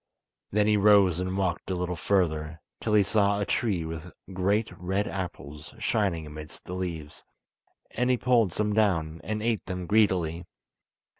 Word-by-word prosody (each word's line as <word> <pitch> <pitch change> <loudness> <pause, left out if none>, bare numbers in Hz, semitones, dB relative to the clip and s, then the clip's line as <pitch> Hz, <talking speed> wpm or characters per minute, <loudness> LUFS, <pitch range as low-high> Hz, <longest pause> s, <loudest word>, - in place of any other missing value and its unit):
Then 105 +1 +2
he 105 0 +3
rose 100 -4 +5
and 95 +1 -2
walked 95 -3 -1
a 95 - 0
little 90 0 -2
further, 80 -3 0 0.2
till 110 -1 0
he 105 - +6
saw 100 0 +2
a 100 - 0
tree 100 -9 0
with 80 +1 -7 0.2
great 100 +4 +1
red 95 +3 -1
apples 75 - -6
shining 100 -7 0
amidst 75 0 -10
the 90 - -6
leaves, 85 -5 -5 0.7
and 125 +2 0
he 125 - +3
pulled 120 -6 +3
some 105 +4 -1
down, 85 -7 +1
and 110 0 -3
ate 115 -2 0
them 90 -1 -4
greedily. 90 -5 +1
95 Hz, 160 wpm, -27 LUFS, 85-105 Hz, 0.7 s, he